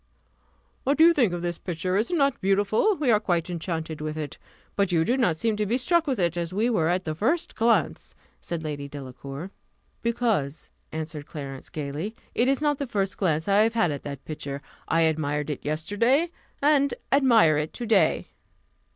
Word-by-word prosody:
"What 280 +2 +1
do 320 - +7
you 340 - +7
think 245 - +3
of 175 0 -4
this 175 -1 -2
picture? 180 +1 -2
is 215 +4 +1
it 355 - 0
not 275 -3 +2
beautiful? 205 - +2
We 285 -7 +1
are 210 - +5
quite 175 -4 -1
enchanted 160 -2 -4
with 155 0 -4
it; 150 -2 -5 0.4
but 200 -2 +1
you 165 -2 +3
do 240 - +2
not 180 -12 +2
seem 220 +5 0
to 210 - 0
be 235 +5 +1
struck 335 +5 +2
with 265 -3 0
it, 170 -2 +1
as 170 -1 -3
we 220 +6 +1
were 165 -8 +2
at 180 +1 0
the 155 - -2
first 260 - 0
glance," 190 - +1 0.3
said 170 -2 -4
Lady 145 -2 -4
Delacour. 140 +4 -8 0.5
"Because," 220 - -1 0.2
answered 155 -2 -5
Clarence, 135 -4 -7
gaily, 155 +8 -4 0.2
"it 240 - +2
is 275 +2 +1
not 295 -2 +1
the 280 - -2
first 195 -4 -1
glance 160 -4 0
I 200 0 +4
have 225 +1 +2
had 175 -8 +2
at 145 - -4
that 140 -2 -7
picture 145 -2 -6 0.2
I 165 - +2
admired 150 -2 0
it 145 - -6
yesterday, 230 - +1 0.3
and 280 -1 +3 0.2
admire 235 - +5
it 155 +1 -3
to 240 - -5
day." 215 -3 +2
180 Hz, 195 wpm, -26 LUFS, 155-235 Hz, 0.5 s, do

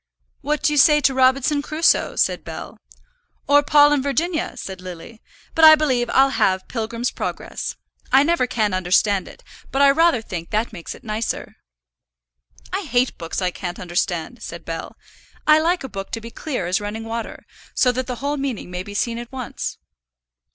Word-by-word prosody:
"What 300 +2 -1
do 310 -3 +3
you - - 0
say 300 +1 +6
to 275 -2 +2
Robinson 265 +3 +3
Crusoe?" 310 +3 +2
said - - +1
Bell. - - -8 0.7
"Or 290 +1 +6
Paul 290 0 +5
and 290 - +1
Virginia?" 315 +5 -1
said 190 -1 -7
Lily. 185 +5 -10 0.3
"But 325 - +1
I 315 0 +11
believe 260 -6 0
I'll 270 +1 +4
have 185 -7 +1
Pilgrim's 230 +1 -3
Progress. - - -5 0.4
I 270 +1 +6
never 325 -5 +1
can 215 -4 0
understand 185 +2 +2
it, - - -14 0.3
but 270 - -1
I 280 0 +7
rather 315 -5 +3
think 170 -5 -6
that 215 +2 -1
makes 170 -5 -7
it - - -16
nicer." 220 +1 -4 1.2
"I 385 - 0
hate 255 - 0
books 165 +2 -4
I 180 - +1
can't 175 0 -6
understand," 175 +4 -2
said - - -8
Bell. - - -6 0.5
"I 305 0 +6
like 345 +1 +1
a - - -4
book 195 -5 -7
to 225 - -2
be 230 +1 -10
clear 255 - -4
as 185 +4 0
running 210 +2 -5
water, 225 0 -6 0.3
so 250 - +4
that 255 0 -3
the 250 - -3
whole 285 +4 -2
meaning 265 -9 -4
may 180 0 -4
be 205 +2 -9
seen 230 +2 -1
at 240 0 -9
once." 255 -2 -5
245 Hz, 185 wpm, -21 LUFS, 205-290 Hz, 1.2 s, I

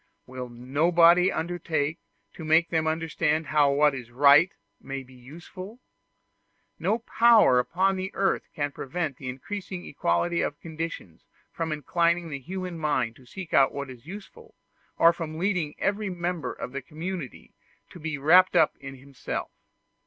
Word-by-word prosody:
Will 125 -1 -7
nobody 165 +9 +4
undertake 160 -2 -2 0.3
to 165 - -9
make 160 +2 +3
them 160 -1 +1
understand 160 -1 0
how 145 -2 +3
what 145 +1 +3
is 125 -3 -7
right 140 +7 +6 0.3
may 135 0 -6
be 130 0 -18
useful? 170 - -11 1.0
No 220 - +1
power 230 - +5
upon 185 +8 0
earth 195 0 0
can 145 -3 -2
prevent 145 0 -4
the 130 - -6
increasing 180 +7 -6
equality 145 - 0
of 145 - -3
conditions 160 - -7 0.2
from 165 -1 -3
inclining 170 +3 0
the 140 -2 -5
human 180 +3 -6
mind 130 -7 0
to 130 - -19
seek 185 +5 -9
out 135 - +5
what 140 -1 -5
is 125 +2 -14
useful, 325 - -11 0.4
or 170 +1 +6
from 160 -2 -6
leading 175 -4 -1
every 205 0 -1
member 175 -5 -3
of - - -7
the 140 +1 -5
community 160 +1 -7 0.4
to 175 - -11
be 155 -1 -4
wrapped 165 +7 +5
up 155 - +4
in 135 -1 -8
himself. 135 0 -6
160 Hz, 150 wpm, -26 LUFS, 140-175 Hz, 1.0 s, right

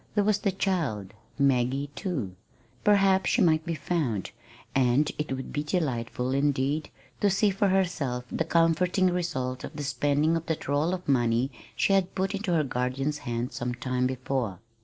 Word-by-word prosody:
There 205 - +3
was 210 0 +2
the 200 - +1
child, 155 - -1 0.2
Maggie, 135 0 +1
too. 135 - -3 0.5
Perhaps 195 -3 +4
she - - +2
might 160 -2 +3
be 165 - -1
found, 140 - -2 0.4
and 135 +3 +3
it 150 - -2
would 130 0 -4
be 145 - 0
delightful, 130 -6 -1
indeed, 140 +2 +1 0.3
to 205 - +3
see 200 +2 +3
for 195 +1 +1
herself 170 -10 0
the - - 0
comforting 170 +3 +2
results 130 -8 -2
of - - -7
the 145 - -4
spending 145 +4 +1
of 165 0 -3
that 160 - -3
roll 150 +6 +1
of 185 - -10
money 120 -1 +2 0.2
she 195 - +2
had 190 -2 +1
put 190 +1 0
into 200 -2 -2
her 160 -2 +3
guardian's 135 +3 -2
hands 120 +1 -2
some 120 0 -3
time 125 +1 0
before. 130 -6 -2
145 Hz, 170 wpm, -27 LUFS, 130-180 Hz, 0.5 s, Perhaps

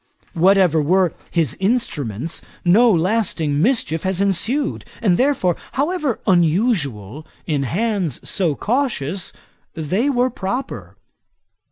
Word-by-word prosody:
Whatever 180 -2 +4
were 180 +2 +2 0.2
his 155 -6 0
instruments, 170 - -1 0.2
no 220 +8 +5
lasting 170 -5 0
mischief 195 - +1
has 190 -1 -1
ensued; 220 - 0 0.2
and 195 -6 +2
therefore, 250 - +1 0.2
however 295 -3 -1
unusual, 160 - +1 0.2
in 150 -3 -1
hands 185 - -1
so 170 -7 0
cautious 205 - -1 0.4
they 185 - 0
were 250 -1 +1
proper. 245 +5 -5
185 Hz, 100 wpm, -20 LUFS, 160-230 Hz, 0.4 s, no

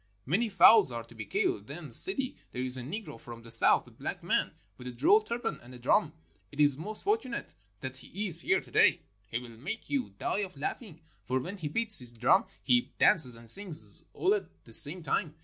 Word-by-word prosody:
Many 215 - -1
fowls 195 - +5
are 115 -1 -6
to 115 - -18
be 110 -3 -9
killed. 100 0 -2
Then, 150 +1 -10
Sidi, 270 -9 +3 0.2
there 125 - -4
is 130 0 -5
a 130 - -7
Negro 160 - -8
from 115 -1 -12
the 115 - -11
South, 115 - +3
a - - -18
black - - -8
man - - -1 0.3
with 125 - -10
a - - -6
droll 400 - +3
turban 235 - -5
and 125 +1 -14
a - - -11
drum. 145 +5 0 0.4
It 145 - -14
is 145 -2 +3
most 205 +9 -2
fortunate 405 - -3 0.3
that 130 0 -7
he 195 +10 -7
is 170 -2 -1
here - - 0
to - - -18
day. - - +3 0.3
He 115 - -3
will 125 0 -9
make 125 - -9
you 275 -3 -2
die - - -3
of 190 -6 -6
laughing, 165 - -7 0.2
for 130 +1 -2
when 180 +10 -8
he 155 - -5
beats 220 +7 +6
his 120 -2 +4
drum 120 +2 +2 0.2
he 120 -1 +1
dances 125 -7 +7
and 115 0 -9
sings 185 - 0
all 385 - 0
at 410 - -4 0.2
the - - -13
same 160 +4 +3
time. 155 0 -3
150 Hz, 220 wpm, -28 LUFS, -, 0.4 s, dances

